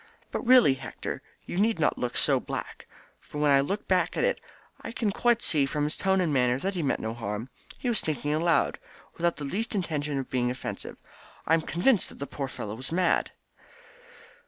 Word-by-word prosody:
But - - -2
really, 250 - +7
Hector, 130 -3 -6 0.2
you 175 - -3
need 220 +2 +3
not 155 -2 +2
look 125 -1 -2
so - - +3
black, - - -6 0.3
for - - -10
when 150 -1 +3
I 135 0 +6
look 200 +9 -3
back 185 -1 +1
at - - +1
it - - +1 0.4
I 225 - -6
can 225 -3 0
quite 240 +3 +2
see 145 -4 +3
from 150 +2 -1
his 150 +1 -1
tone 190 0 +2
and 165 -5 +1
manner 125 -2 +3
that 195 +8 -2
he 180 - -2
meant 140 - 0
no 110 0 -3
harm. 110 +1 -4 0.3
He - - -4
was 235 -4 +2
thinking 145 -1 -1
aloud, 165 +2 +2 0.4
without 170 0 +1
the 145 0 -5
least 220 - -3
intention 150 -6 -1
of 135 - -4
being 125 -1 +1
offensive. 125 +1 -6 0.5
I 160 - +2
am 165 - +4
convinced 185 +8 +2
that - - -13
the 140 - -4
poor 140 -1 -4
fellow 105 -5 -6
was 130 +6 -5
mad." 180 +2 +2
150 Hz, 205 wpm, -28 LUFS, 135-190 Hz, 0.5 s, really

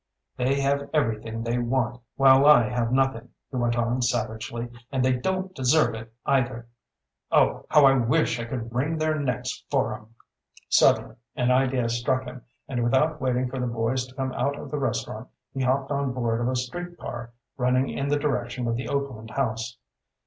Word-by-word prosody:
"They 135 +3 +1
have 140 +1 0
everything 115 -4 -1
they 120 +1 -1
want, 120 0 -1
while 135 +1 +6
I 125 -6 +7
have 120 -1 -1
nothing," 135 -3 +1 0.2
he 130 - -3
went 120 -1 +1
on 120 +2 0
savagely. 115 -1 -2 0.2
"And 130 -2 +1
they 130 - +4
don't 185 +8 -2
deserve 135 +1 +3
it, 110 0 -8
either. 125 -3 0 0.6
Oh, - - +3
how 150 -2 +6
I 135 - +7
wish 130 +2 +2
I 115 - -3
could 115 -1 -5
wring 145 +7 0
their 155 0 0
necks 125 -2 -3
for 135 -5 +1
'em!" 110 +1 -12 0.5
Suddenly - - +3 0.2
an 125 0 +1
idea 130 -1 +2
struck 120 +3 0
him 125 +1 -8 0.3
and 120 -3 -1
without 150 +6 +2
waiting 125 -1 +1
for 130 +1 -5
the 125 - -1
boys 120 +2 -1
to 130 - -17
come 130 -1 -2
out 140 0 -1
of - - -8
the 150 - -2
restaurant 135 - -3 0.3
he 135 - -3
hopped 135 +2 +1
on 140 -2 0
board 120 -2 -1
of 120 - 0
a 130 - 0
street 175 +8 -4
car 120 0 -7 0.2
running 125 +1 +2
in 140 - -2
the 145 - +2
direction 125 -4 -2
of 115 - 0
the 125 - -4
Oakland 135 -6 -3
House. 115 -2 -2
125 Hz, 185 wpm, -25 LUFS, 120-135 Hz, 0.6 s, I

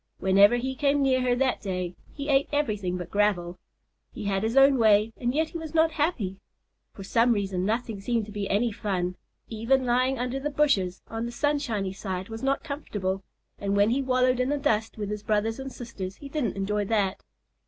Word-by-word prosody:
Whenever 200 +4 +5
he 260 +2 -2
came 280 +1 +2
near 260 -1 +3
her 250 -1 +2
that 260 +1 0
day, 185 -3 -3 0.2
he 280 0 -6
ate 275 -1 +3
everything 210 -11 -1
but 180 - -7
gravel. 185 -4 +1 0.5
He 225 - -7
had 195 -1 0
his 225 +4 -1
own 270 -1 +6
way 215 0 +4
and 245 -1 -1
yet 315 +4 0
he 335 - -6
was 320 0 -7
not 320 0 +4
happy. 275 - -1 0.5
For 195 - -10
some 230 +5 +3
reason, 195 -3 -1
nothing 225 -1 -2
seemed 230 +1 0
to 210 - -11
be 205 -1 -4
any 225 +4 +2
fun. 185 -4 -2 0.3
Even 235 +4 +1
lying 255 +2 +2
under 250 +2 -2
the 295 +2 -2
bushes 255 -12 +1
on 225 +1 -4
the - - -6
sunshiny 240 -8 -1
side 190 -1 -5
was 225 0 -6
not 270 +1 0
comfortable, 205 -11 -3 0.4
and 200 0 -1
when 205 +2 +4
he 270 +3 +1
wallowed 255 -1 +2
in 250 +1 +1
the 290 - +1
dust 225 -5 0
with 205 -1 -4
his 210 0 -4
brothers 215 +3 0
and 270 0 -6
sisters 200 -7 -7
he 280 - -10
didn't 270 -9 -2
enjoy 205 +1 0
that. 200 -2 0
225 Hz, 205 wpm, -27 LUFS, 200-270 Hz, 0.5 s, own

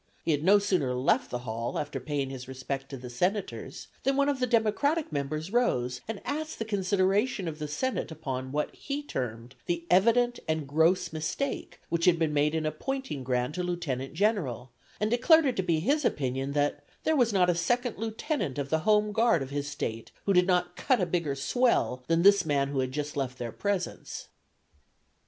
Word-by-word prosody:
He 165 - +1
had 145 -1 0
no 200 +4 +7
sooner 180 -11 +1
left 125 +2 +2
the 125 - -2
hall 115 +1 -3
after 145 -2 -3
paying 135 0 -2
his 130 -1 -7
respects 130 +1 -5
to 135 - -6
the 125 0 -8
Senators 180 - -2 0.2
than 270 0 +1
one 280 0 +3
of 280 -2 0
the 250 - +1
Democratic 245 - +1
members 155 +5 -3
rose 125 - +1
and 220 -2 -5
asked 310 +2 -3
the 225 - -3
consideration 200 +1 +1
of 155 -1 -5
the 150 - -3
Senate 260 - -2
upon 130 -5 -5
what 150 +1 -1
he 285 +1 -4
termed 120 - -5
the 170 -1 -1
evident 235 +6 +4
and 160 -1 0
gross 165 +4 +2
mistake 160 - -3
which 170 0 +1
had 180 -2 +5
been 160 -2 0
made 150 +2 +2
in 160 -1 -1
appointing 210 - -3
Grant 125 +5 -1
a - - 0
Lieutenant 160 -7 -3
General, 160 - 0 0.3
and 215 +1 0
declared 320 +6 +5
it 260 -3 +1
to - - +3
be 170 -3 +1
his 285 - +1
opinion 135 - -1
that 145 0 0 0.2
'there 315 - +2
was 245 -5 +3
not 185 -3 +3
a 175 - +4
second 240 +7 0
lieutenant 220 - -2
of 140 -1 -3
the 160 - +3
Home 210 +4 +3
Guard 225 - +3
of 135 - -9
his 145 0 -2
State 115 -6 -4 0.2
who 200 - +3
did 180 0 +4
not 180 -1 +1
"cut 255 +4 +2
a 180 - +2
bigger 170 -5 -1
swell" 185 - +1
than 165 +1 +2
this 200 0 +7
man 140 -3 +1
who 140 -1 -1
had 130 0 -1
just 150 +1 -3
left 130 -2 -2
their 120 -1 -4
presence. 200 - -3
170 Hz, 200 wpm, -29 LUFS, 140-215 Hz, 0.3 s, no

